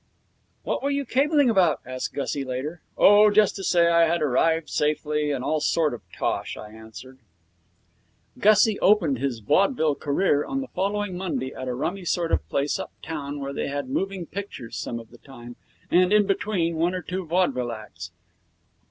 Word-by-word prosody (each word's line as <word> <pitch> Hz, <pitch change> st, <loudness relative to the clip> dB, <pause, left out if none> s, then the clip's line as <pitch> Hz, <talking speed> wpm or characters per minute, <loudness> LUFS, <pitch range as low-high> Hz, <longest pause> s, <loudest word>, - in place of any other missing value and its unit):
'What -, -, -2 dB
were 280 Hz, -, -1 dB
you 280 Hz, 0 st, -1 dB
cabling 285 Hz, +3 st, +2 dB
about?' 185 Hz, -9 st, +3 dB
asked 130 Hz, +1 st, -5 dB
Gussie, 140 Hz, 0 st, -2 dB
later. 135 Hz, +6 st, -5 dB, 0.2 s
'Oh 210 Hz, +1 st, +7 dB
just 210 Hz, -1 st, +3 dB
to 195 Hz, -, -6 dB
say 170 Hz, -2 st, +3 dB
I 170 Hz, 0 st, +4 dB
had 170 Hz, 0 st, 0 dB
arrived 160 Hz, +4 st, +1 dB
safely, 150 Hz, 0 st, -1 dB
and 135 Hz, -3 st, -2 dB
all 155 Hz, +3 st, 0 dB
that -, -, -2 dB
sort 160 Hz, -4 st, +1 dB
of 120 Hz, -, -7 dB
tosh,' -, -, -3 dB
I 105 Hz, -, -10 dB
answered. 110 Hz, +4 st, -12 dB, 1.2 s
Gussie 215 Hz, 0 st, +4 dB
opened 170 Hz, -, +3 dB
his 130 Hz, -4 st, -2 dB
vaudeville 160 Hz, -, +2 dB
career 145 Hz, +1 st, +1 dB
on 270 Hz, -, -3 dB
the 265 Hz, -, -7 dB
following 200 Hz, 0 st, -2 dB
Monday 175 Hz, -8 st, -3 dB
at 130 Hz, -, -7 dB
a 125 Hz, -, -2 dB
rummy 180 Hz, +9 st, -3 dB
sort 170 Hz, 0 st, -1 dB
of -, -, 0 dB
place 140 Hz, +1 st, -1 dB
uptown 145 Hz, -3 st, -6 dB
where 140 Hz, 0 st, -5 dB
they -, -, -3 dB
had 140 Hz, -2 st, -4 dB
moving 195 Hz, +2 st, -2 dB
pictures 190 Hz, -, -7 dB
some 115 Hz, -, -4 dB
of 115 Hz, 0 st, -14 dB
the 120 Hz, -, -16 dB
time 120 Hz, -3 st, -12 dB, 0.4 s
and, 180 Hz, +1 st, +4 dB
in 210 Hz, -1 st, +5 dB
between, 185 Hz, -4 st, -1 dB
one 175 Hz, +3 st, +1 dB
or 180 Hz, -, -4 dB
two 185 Hz, +1 st, -4 dB
vaudeville 140 Hz, -9 st, 0 dB
acts. 110 Hz, -2 st, -9 dB
165 Hz, 180 wpm, -24 LUFS, 135-195 Hz, 1.2 s, Oh